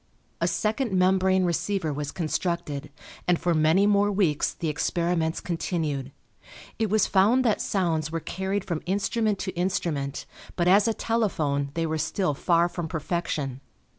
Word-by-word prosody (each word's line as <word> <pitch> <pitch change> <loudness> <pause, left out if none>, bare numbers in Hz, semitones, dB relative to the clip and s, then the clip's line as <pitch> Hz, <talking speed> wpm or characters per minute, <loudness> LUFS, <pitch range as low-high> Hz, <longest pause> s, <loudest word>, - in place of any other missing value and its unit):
A - - +2
second 220 +2 0
membrane 185 0 +3
receiver 175 -1 -1
was 145 0 -4
constructed, 160 -3 -2 0.4
and 175 -1 +3
for 175 - +1
many 160 +5 +4
more 205 0 +3
weeks 185 -7 +1
the 165 - -3
experiments 165 +1 0
continued. 155 -6 -2 0.7
It 220 -2 +1
was 215 0 +3
found 215 +7 +3
that 220 - +2
sounds 165 -6 0
were 165 - -1
carried 190 +4 -3
from 170 -4 -3
instrument 205 +2 0
to 190 - -2
instrument, 170 -6 -2 0.3
but 175 -1 +1
as 200 +4 +5
a 225 - +1
telephone 155 -12 0
they 165 0 0
were 160 0 -2
still 160 +2 0
far 170 +4 +2
from 175 -1 -4
perfection. 155 -5 -3
175 Hz, 150 wpm, -26 LUFS, 155-195 Hz, 0.7 s, as